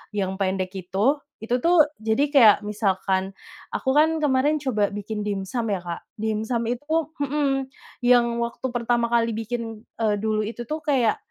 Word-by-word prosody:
yang 190 -1 -1
pendek 185 0 -1
itu. 195 - 0 0.2
Itu 240 +3 -2
tuh 335 -3 +5 0.2
jadi 225 +6 +2
kayak 225 -6 +8
misalkan 195 -2 0 0.4
aku 265 +1 -1
kan 320 +1 +4
kemarin 295 +1 +2
coba 220 -7 0
bikin 205 +1 -4
dimsum 205 +3 -2
ya 195 - 0
Kak. 175 -1 -6 0.2
Dimsum 220 +2 -1
itu 245 +6 -4 0.2
hmm, 280 -1 0 0.4
yang 235 -1 +4
waktu 235 +2 -4
pertama 235 0 +1
kali 230 -1 +2
bikin, 225 0 -4 0.2
eee, 210 -1 +2
dulu 215 0 0
itu 235 +2 -6
tuh 310 +1 -4
kayak, 260 -7 +2
230 Hz, 155 wpm, -24 LUFS, 205-265 Hz, 0.4 s, kayak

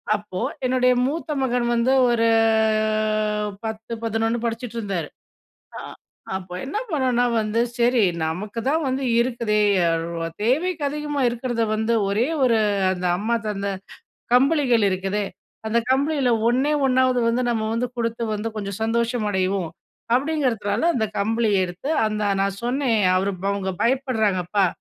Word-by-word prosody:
அப்போ, 205 -3 -6 0.3
என்னுடைய 250 0 +3
மூத்த 310 +4 -3
மகன் 250 -2 0
வந்து 235 +2 +2 0.2
ஒரு 230 -1 +2 1.4
10,11 225 +1 -2
படிச்சிட்டு 235 0 -4
இருந்தாரு. 195 -8 -3 0.7
ஆ - - -5 0.6
அப்போ 185 -1 -6
என்ன 285 +10 -4
பண்ணுனா 255 -5 +1 0.2
வந்து, 215 +1 -1 0.2
"சரி 240 0 +3 0.2
நமக்கு 195 +8 -3
தான் 315 +3 +1
வந்து 265 +1 -1 0.2
இருக்குதே 235 -3 0 0.8
தேவைக்கு 305 +8 0
அதிகமா 295 0 -3
இருக்கிறத 240 -1 -2
வந்து 220 +2 0 0.2
ஒரே 215 +6 +1 0.2
ஒரு 235 -3 +4 0.3
அந்த 180 -1 -3
அம்மா 220 +5 0
தந்தை 200 -1 -2 0.6
கம்பளிகள் 255 -3 +4
இருக்குதே, 195 +2 -1 0.4
அந்த 220 +2 +1
கம்பிளியில 275 -1 +2 0.2
ஒன்னே 260 +5 +2
ஒன்னாவது 255 -1 +3
வந்து 235 +2 +1
நம்ம 220 -2 -1
வந்து 245 +2 -1
குடுத்து 230 0 -2
வந்து 215 +2 -3
கொஞ்சம் 200 0 -5
சந்தோஷமடைவோம்" 210 -6 0 0.4
அப்படிங்கிறதுனால 250 -7 0
அந்த 220 -4 +1
கம்பளியை 220 0 +1
எடுத்து, 180 - -6 0.2
அந்த 215 0 -2 0.2
நான் 195 0 -2
சொன்னேன் 245 -2 +1 0.2
"அவர் 195 +2 -1 0.2
அவங்க 195 -1 -2
பயப்படுறாங்கப்பா 215 -7 +1
230 Hz, 125 wpm, -23 LUFS, 210-255 Hz, 1.4 s, ஒரு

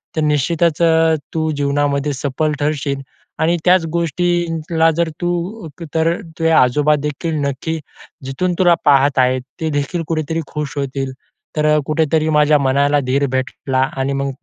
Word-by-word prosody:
तर 155 - 0
निश्चितच 155 +2 +1
अ, 160 -1 +4 0.2
तू 160 -1 0
जीवनामध्ये 145 0 0
सफल 145 +3 -1
ठरशील 140 -2 -1 0.4
आणि 170 +2 +2
त्याच 180 -1 +4
गोष्टीला 165 -1 +1
जर 170 -1 +1
तू 175 +3 -3 0.3
तर 165 +1 +2 0.3
तुझे 165 - +2
आजोबादेखील 150 +3 +2
नक्की 160 +4 -3 0.5
जिथून 175 +7 -1
तुला 175 -2 +5
पाहत 140 -1 +4
आहेत, 130 0 +2 0.2
ते 160 - 0
देखील 150 +4 -2
कुठेतरी 160 0 -2
खुश 150 -1 -5
होतील. 135 -1 -3 0.5
तर 150 - +2 0.2
कुठेतरी 155 0 +1
माझ्या 150 -1 +4
मनाला 140 +2 +2
धीर 140 +2 +1
भेटला 130 0 -2 0.2
आणि 135 +1 -1
मग 140 0 -1
150 Hz, 135 wpm, -18 LUFS, 140-165 Hz, 0.5 s, तुला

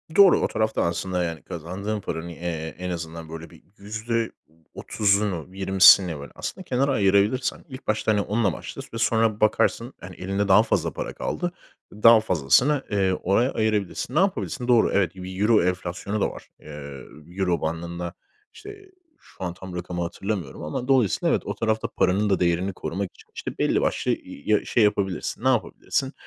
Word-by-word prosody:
Doğru, 195 -3 +7
o - - +2
tarafta 110 0 0
aslında 90 +1 -1
yani 85 -5 -4
kazandığın 100 +6 -5
paranın, 80 -1 -5
eee, 80 -2 -5
en 90 +1 -4
azından 85 -2 -6
böyle 80 0 -8
bir - - -18
%30'unu, 100 -3 -2
%20'sini 95 -3 +6
böyle 70 - -9
aslında 190 - -6
kenara 135 +1 +1
ayırabilirsen 105 +4 +2
ilk 130 +1 -10
başta 110 -1 +1
onla 105 -3 0
başla; - - -7
sü 115 - -8
sonra 115 -2 +2
bakarsın, 115 +3 +1
hani, 90 0 -9
elinde 100 +2 -2
daha - - +6
fazla - - 0
para - - -5
kaldı, 175 0 -3 0.4
daha 115 +2 +7
fazlasını, 110 - +2
eee, 95 -2 +2
oraya 100 +8 +1
ayırabilirsin. 110 +3 -1
Ne - - +4
yapabilirsin? 180 -9 -1
Doğru 120 -2 +4
evet, 95 -3 +1
bir 95 +1 -7
euro 105 -2 +4
enflasyonu 90 +3 -2
da - - +2
var. - - -12
Eee, 70 -3 -9 0.3
euro 90 -1 -1
bandında, 85 +2 -4 0.4
işte, 405 -2 -12 0.3
şu - - -13
an 90 -1 -3
tam 95 0 -9
rakamı 90 0 -4
hatırlamıyorum 85 -4 -4
ama 75 +12 -4
dolayısıyla 130 -8 +2
evet - - -4
o - - -3
tarafta 110 -1 0
paranın 100 +3 +1
da 95 - +2
değerini 90 +2 +1
korumak 90 +3 -4
için, - - -20
işte, - - -6
belli - - +2
başlı, - - 0
ııı, - - -1
ya, 105 +9 -1
şey 120 - +2
yapabilirsin. 100 +1 -1
Ne - - +2
yapabilirsin? 130 +2 0
100 Hz, 165 wpm, -24 LUFS, 85-110 Hz, 0.4 s, Doğru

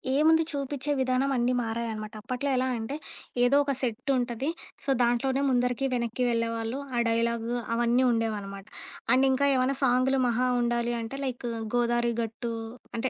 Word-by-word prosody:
ఏముంది 320 +3 +5
చూపిచ్చే 280 0 -3
విధానం 260 +1 +1
అన్నీ 245 +1 +2
మారాయనమాట. 225 -2 -4
అప్పట్లో 255 +4 -3
ఎలా 255 +1 +1
అంటే 225 +5 -4 0.5
ఏదో 245 +3 +4
ఒక 280 - -1
సెట్టుంటది. 250 +1 -1 0.3
సో, - - -5
దాంట్లోనే 260 +3 +1
ముందరికి 250 +1 +1
వెనక్కి 235 0 -1
వెళ్ళేవాళ్ళు, 230 +1 -1 0.2
ఆ - - +2
డైలాగు, 230 0 0 0.2
అవన్నీ 240 +2 +3
ఉండేవనమాట. 205 -4 -2 0.5
అండ్ 260 +1 +5
ఇంక 260 +1 0
ఏమైనా 260 +1 +2
సాంగు‌లు 260 +1 +3
మహా 245 +2 +1
ఉండాలి 240 0 0
అంటే 225 +4 -6
లైకు 245 -2 -3 0.3
గోదావరి 240 0 +2
గట్టు 230 +1 -4 0.4
అంటే 255 +3 0
245 Hz, 140 wpm, -28 LUFS, 230-260 Hz, 0.5 s, ఏముంది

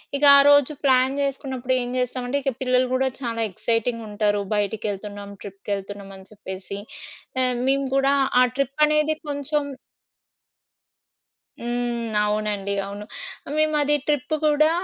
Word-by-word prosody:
ఇక 285 - -2
ఆరోజు 285 0 +6
ప్లాన్ 260 -1 +4
చేసుకున్నప్పుడు 265 -2 -2
ఏం 245 - -4
జేస్తామంటే 250 +1 -1
ఇక 270 0 0
పిల్లలు 255 0 +2
కూడా 265 +1 +2
చాలా 230 -3 -3
ఎక్సైటింగ్‌గా 230 +4 -1
ఉంటరు. 205 -1 +1
బయటికెళ్తున్నాం 205 0 -3
ట్రిప్‌కెళ్తున్నామని 195 -1 -6
చెప్పేసి 195 -1 -7 0.6
ఆహ్, 250 -1 +1
మేము 275 +1 +2
కూడా 275 +1 +3 0.3
ఆ - - +7
ట్రిప్ 275 +1 -2
అనేది 305 +1 +2
కొంచెం 290 +1 -1 1.9
హ్మ్. 240 0 -2 0.3
అవునండి. 210 -1 -1
అవును. 200 +1 -7 0.5
మేమది 300 -1 +2
ట్రిప్ 295 0 0
కూడా 305 +1 +4
245 Hz, 115 wpm, -23 LUFS, 205-275 Hz, 1.9 s, ఆ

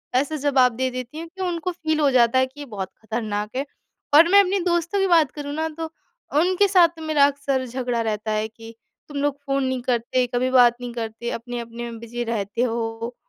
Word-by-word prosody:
ऐसा 285 +4 +1
जवाब 265 -4 +3
दे 260 +2 0
देती 255 +4 -6
हूँ, 335 - -6
कि 380 +3 -10
उनको 350 +1 -2
फ़ील 315 -2 -2
हो 290 -2 +3
जाता 250 0 +4
है 260 - +4
कि 265 +3 -17
ये 290 - -6
बहुत 190 -1 -4
खतरनाक 220 -1 -3
है। 270 +2 -1 0.5
और 320 +3 +8
मैं 400 +3 +7
अपने 390 +1 0
दोस्तों 345 +3 0
की 390 - +2
बात 325 -6 +4
करूँ 290 0 -6
ना, 320 +1 -1
तो 320 0 -6 0.5
उनके 370 +4 +3
साथ 360 -3 +6
तो 325 - -11
मेरा 310 -2 +2
अक्सर 280 -2 -1
झगड़ा 245 -1 -2
रहता 215 -1 -2
है 215 0 0
कि, 225 +1 -13 0.3
"तुम 290 -1 -7
लोग 285 -1 0
फ़ोन 275 0 0
नहीं 260 -1 -1
करते, 245 +1 0
कभी 250 +1 +1
बात 245 -2 +6
नहीं 245 -1 -5
करते, 230 0 -5
अपने-अपने 235 0 -6
में 230 - -8
बिज़ी 235 +1 -5
रहते 225 -1 -2
हो" 230 0 -3
255 Hz, 215 wpm, -23 LUFS, 235-310 Hz, 0.5 s, और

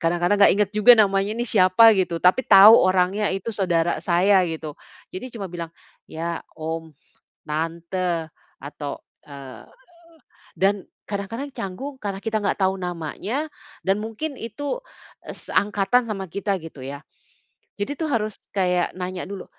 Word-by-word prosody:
kadang-kadang 175 +4 +1
enggak - - +7
inget 205 -1 +1
juga 215 +3 +7
namanya 195 -1 +2
nih, 240 - -1
siapa 205 +3 +6
gitu. 175 -2 0
Tapi 180 +8 +5
tahu 205 +3 +9
orangnya 185 +3 +2
itu 195 +4 -4
saudara 175 -4 0
saya, 190 +2 +3
gitu. 160 -2 -5 0.4
Jadi 255 +8 -6
cuma 195 -3 -5
bilang 170 -1 -6 0.4
ya, 165 +1 -4 0.2
om, 160 0 -5 0.5
tante 165 +2 -2 0.3
atau, 145 0 -7 0.3
eee 135 -5 -11 0.9
dan 195 +1 +2 0.3
kadang-kadang 225 +8 -5
canggung 255 +10 -6
karena 200 -2 -4
kita 215 +1 -2
enggak 200 - 0
tahu 190 0 +3
namanya 180 - -4 0.4
dan 195 +2 +2
mungkin 225 +8 -5
itu, 285 - -5 0.4
e - - -7
seangkatan 205 +4 +1
sama 195 -2 -3
kita, 200 +2 -2
gitu 155 -5 -10
ya. 140 +1 -7 0.8
Jadi 205 +8 -3
tuh, 320 - 0
harus 215 -6 -2 0.2
kayak 180 -2 0
nanya 180 0 -5
dulu, 195 -1 -7
190 Hz, 140 wpm, -23 LUFS, 170-210 Hz, 0.9 s, tahu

